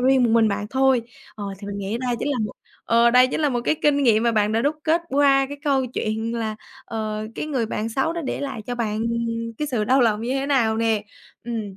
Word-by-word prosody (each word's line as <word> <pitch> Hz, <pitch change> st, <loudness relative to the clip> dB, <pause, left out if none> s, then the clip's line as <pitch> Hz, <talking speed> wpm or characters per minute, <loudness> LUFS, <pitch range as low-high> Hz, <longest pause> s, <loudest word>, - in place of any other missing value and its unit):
riêng 260 Hz, 0 st, +4 dB
một 230 Hz, -, +2 dB
mình 225 Hz, -1 st, +4 dB
bạn 205 Hz, +1 st, -2 dB
thôi. 265 Hz, -2 st, +3 dB, 0.3 s
Ờ, 205 Hz, -, -6 dB
thì 200 Hz, -, -9 dB
mình 200 Hz, 0 st, -5 dB
nghĩ 200 Hz, +4 st, -3 dB
đây 245 Hz, -1 st, -1 dB
chính -, -, -2 dB
là 285 Hz, -, 0 dB
một 210 Hz, -, -5 dB, 0.3 s
ờ, 235 Hz, +1 st, +4 dB
đây 250 Hz, +1 st, +6 dB
chính 265 Hz, -, -3 dB
là 295 Hz, -, +3 dB
một 245 Hz, -2 st, -1 dB
cái -, -, +2 dB
kinh 285 Hz, -1 st, +3 dB
nghiệm 225 Hz, -4 st, +4 dB
mà 235 Hz, -, +2 dB
bạn 210 Hz, -1 st, +2 dB
đã 225 Hz, -, +2 dB
đúc 295 Hz, +4 st, 0 dB
kết 330 Hz, +2 st, +2 dB
qua 275 Hz, -1 st, +4 dB
cái 285 Hz, +1 st, -7 dB
câu 270 Hz, -3 st, +2 dB
chuyện, 225 Hz, -1 st, -3 dB
là, 220 Hz, -2 st, -3 dB, 0.3 s
ờ, 215 Hz, -1 st, -4 dB
cái -, -, -4 dB
người 260 Hz, -7 st, -1 dB
bạn 220 Hz, +1 st, -3 dB
xấu 270 Hz, +8 st, 0 dB
đó 340 Hz, -, -4 dB
để -, -, -3 dB
lại 270 Hz, -6 st, -4 dB
cho 245 Hz, -, -3 dB
bạn 220 Hz, -2 st, -2 dB, 0.6 s
cái 300 Hz, -, -1 dB
sự 240 Hz, -6 st, 0 dB
đau 260 Hz, +5 st, +3 dB
lòng 220 Hz, -3 st, +2 dB
như 245 Hz, -, -1 dB
thế 270 Hz, 0 st, -1 dB
nào 235 Hz, -6 st, +2 dB
nè. 225 Hz, -2 st, +1 dB, 0.4 s
Ừm. 220 Hz, -5 st, -5 dB
235 Hz, 255 wpm, -23 LUFS, 220-270 Hz, 0.6 s, đây